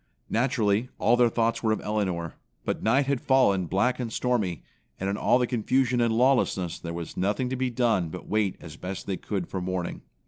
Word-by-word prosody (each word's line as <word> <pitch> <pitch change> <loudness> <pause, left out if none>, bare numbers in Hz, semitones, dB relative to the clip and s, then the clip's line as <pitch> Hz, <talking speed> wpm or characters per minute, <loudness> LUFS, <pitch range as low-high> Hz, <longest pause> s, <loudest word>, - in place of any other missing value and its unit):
Naturally, 115 -1 +1
all 115 +3 +4
their 120 -1 +4
thoughts 115 0 0
were 110 - +1
of 110 - +1
Elinor, 95 -6 -2 0.3
but - - -2
night 130 +6 +3
had 140 -2 0
fallen 100 -9 +3
black 115 +9 +1
and 120 -3 -3
stormy, 110 - -1 0.4
and 95 - -2
in 100 - 0
all 120 - +3
the 125 - +2
confusion 125 +1 +1
and 115 -1 +2
lawlessness 120 -9 +2
there 85 - -6
was 85 -1 -6
nothing 105 +7 0
to 130 - -2
be 130 0 0
done 115 -8 +1
but 90 +3 -8
wait 105 -3 +1
as 80 -2 -10
best 95 +1 -6
they 95 -2 -2
could 95 -2 -3
for 95 - -4
morning. 90 -1 -3
110 Hz, 205 wpm, -27 LUFS, 95-125 Hz, 0.4 s, all